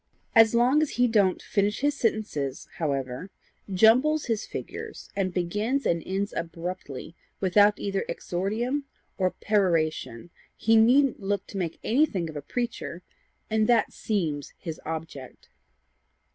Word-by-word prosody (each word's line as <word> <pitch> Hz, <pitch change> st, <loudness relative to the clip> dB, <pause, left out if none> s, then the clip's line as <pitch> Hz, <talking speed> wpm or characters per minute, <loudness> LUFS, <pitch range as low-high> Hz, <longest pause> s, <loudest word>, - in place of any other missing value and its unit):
As 225 Hz, 0 st, +6 dB
long 250 Hz, +6 st, +4 dB
as 310 Hz, -, +1 dB
he 245 Hz, 0 st, +4 dB
don't 205 Hz, -5 st, +2 dB
finish 205 Hz, +2 st, 0 dB
his 290 Hz, +1 st, +2 dB
sentences 210 Hz, -, -2 dB
however, 140 Hz, +1 st, -2 dB, 0.4 s
jumbles 250 Hz, +11 st, +4 dB
his 225 Hz, -3 st, -2 dB
figures, -, -, -7 dB
and 195 Hz, -2 st, 0 dB
begins 210 Hz, +10 st, -1 dB
and 170 Hz, -1 st, +1 dB
ends 195 Hz, +2 st, -2 dB
abruptly 165 Hz, -3 st, -5 dB, 0.3 s
without 205 Hz, +2 st, +4 dB
either 195 Hz, -1 st, -2 dB
exordium 230 Hz, +10 st, -2 dB, 0.3 s
or 185 Hz, -1 st, +3 dB
peroration, 170 Hz, -, 0 dB, 0.3 s
he 225 Hz, 0 st, +3 dB
needn't 250 Hz, +4 st, +5 dB
look 200 Hz, 0 st, -1 dB
to 200 Hz, -, -8 dB
make 170 Hz, -3 st, -3 dB
anything 220 Hz, -, +1 dB
of -, -, -14 dB
a 145 Hz, -, -4 dB
preacher 185 Hz, -, -4 dB, 0.4 s
and 215 Hz, -1 st, +1 dB
that 235 Hz, -2 st, +3 dB
seems 160 Hz, -10 st, -2 dB
his 165 Hz, -3 st, -7 dB
object." 160 Hz, -5 st, -7 dB
200 Hz, 130 wpm, -27 LUFS, 170-225 Hz, 0.4 s, As